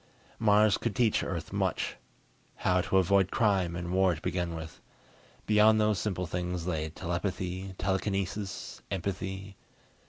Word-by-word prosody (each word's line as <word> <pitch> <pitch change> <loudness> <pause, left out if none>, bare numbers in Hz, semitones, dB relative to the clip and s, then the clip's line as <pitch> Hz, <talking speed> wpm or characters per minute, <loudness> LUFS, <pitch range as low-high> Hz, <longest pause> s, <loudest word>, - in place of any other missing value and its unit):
Mars 105 -1 +5
could 115 -4 -2
teach 115 -4 +2
Earth 85 -4 -4
much. - - -1 0.6
How 90 0 +2
to 95 - +1
avoid 95 0 +4
crime 95 -7 +2
and 85 0 -4
war 95 -2 +3
to 75 - -11
begin 85 -1 -1
with. 80 -1 -8 0.6
Beyond 110 +1 +5
those 105 -2 +2
simple 95 -4 -2
things 90 0 -3
lay 80 -3 -1
telepathy, 95 +2 -3
telekinesis, 95 +1 -2
empathy.... 95 +1 -4
95 Hz, 130 wpm, -30 LUFS, 90-100 Hz, 0.6 s, Mars